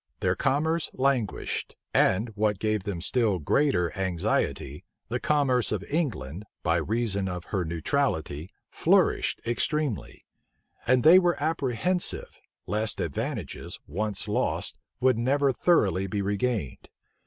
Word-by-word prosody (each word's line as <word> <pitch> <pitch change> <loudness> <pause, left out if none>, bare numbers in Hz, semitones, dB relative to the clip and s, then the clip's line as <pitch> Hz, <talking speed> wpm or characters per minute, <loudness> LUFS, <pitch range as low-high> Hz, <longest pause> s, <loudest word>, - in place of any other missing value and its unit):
Their - - +2
commerce 160 +4 +1
languished; 130 -6 -1 0.2
and, 105 +6 +3
what 105 -1 0
gave 110 -1 -1
them 95 -5 -3
still 110 0 +1
greater 90 - +1
anxiety, 85 -6 -1 0.3
the 125 +3 -1
commerce 135 -5 +2
of 100 -2 -1
England, 105 - -2 0.2
by - - +2
reason 105 -3 0
of 90 -1 -5
her 95 -3 0
neutrality, 80 - -1 0.2
flourished - - +2
extremely; 135 +1 -1 0.6
and 125 0 +4
they 170 +5 +9
were 175 -2 +1
apprehensive, 155 +3 -1 0.2
lest 110 +1 -1
advantages, 75 -5 -4
once 105 +6 -3
lost, 105 - -1 0.2
would 130 -3 +3
never 140 +3 +2
thoroughly 100 - +2
be 100 +1 -2
regained. 100 - -2
110 Hz, 120 wpm, -27 LUFS, 95-140 Hz, 0.6 s, they